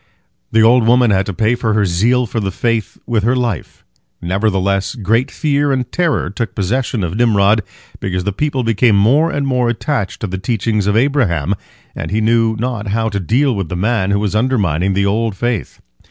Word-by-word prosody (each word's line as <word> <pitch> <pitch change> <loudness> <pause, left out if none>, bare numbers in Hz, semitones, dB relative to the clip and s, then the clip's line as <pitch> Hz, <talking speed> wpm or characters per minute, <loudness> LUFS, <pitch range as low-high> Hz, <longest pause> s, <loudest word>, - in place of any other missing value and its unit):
The 110 0 +4
old 115 0 +4
woman 120 -1 +4
had 95 -1 +1
to - - -2
pay 110 +3 +1
for 115 -3 -1
her 105 -2 +2
zeal 115 +8 +2
for 115 - -3
the 100 -3 -2
faith 115 +2 -2
with 115 -3 0
her 120 +5 +1
life. 120 -8 -3 0.3
Nevertheless 95 +1 0
great 115 +3 0
fear 145 -1 0
and 130 -2 -2
terror 170 - 0
took 115 +2 -4
possession 115 +2 -1
of 85 -1 -3
Nimrod, 110 -2 +3 0.4
because 90 -1 -2
the 100 - -1
people 135 +2 -1
became 115 -1 +2
more 130 +11 +3
and 145 -4 -2
more 125 -3 +1
attached 120 -4 -2
to - - -1
the 95 0 -5
teachings 105 -1 -1
of 105 +1 +2
Abraham, 110 - +1 0.4
and - - -5
he 105 - 0
knew 115 0 +2
not 115 -2 -3
how 110 +2 0
to 100 -2 -3
deal 125 - +1
with 95 -5 -3
the - - -3
man 100 +1 0
who 100 - +2
was 105 -1 -2
undermining 100 - +1
the 100 0 +1
old 110 +1 0
faith. 120 +1 -3
110 Hz, 195 wpm, -16 LUFS, 100-125 Hz, 0.4 s, The